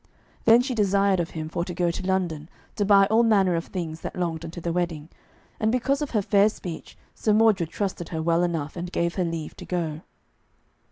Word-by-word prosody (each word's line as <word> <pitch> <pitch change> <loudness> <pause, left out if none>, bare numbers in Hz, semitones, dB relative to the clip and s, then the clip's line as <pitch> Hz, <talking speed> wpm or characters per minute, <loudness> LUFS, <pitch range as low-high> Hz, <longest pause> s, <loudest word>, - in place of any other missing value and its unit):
Then 230 +1 +7
she 260 0 -2
desired 200 -3 +2
of 170 - -1
him 155 0 -3
for 170 +2 -2
to 175 0 -6
go 175 -1 +1
to 185 +2 -5
London, 170 -5 -1 0.3
to 205 - 0
buy 200 -1 +6
all 225 +1 +5
manner 200 -6 +3
of 165 0 -1
things 165 -4 -5
that - - -6
longed 170 -3 -2
unto 165 +1 -7
the 170 0 -3
wedding, 170 -3 -2 0.5
and 220 0 +2
because 255 +3 0
of 295 - -2
her 210 -4 0
fair 200 +1 +4
speech 175 -6 -8 0.2
Sir 215 - +1
Mordred 210 -6 +3
trusted 185 -3 -3
her 160 - -3
well 170 +1 +2
enough, 165 -4 -2
and 175 0 -5
gave 170 -1 0
her 185 - -1
leave 165 -2 -4
to - - -9
go. 165 -4 -3
180 Hz, 215 wpm, -25 LUFS, 165-205 Hz, 0.5 s, Then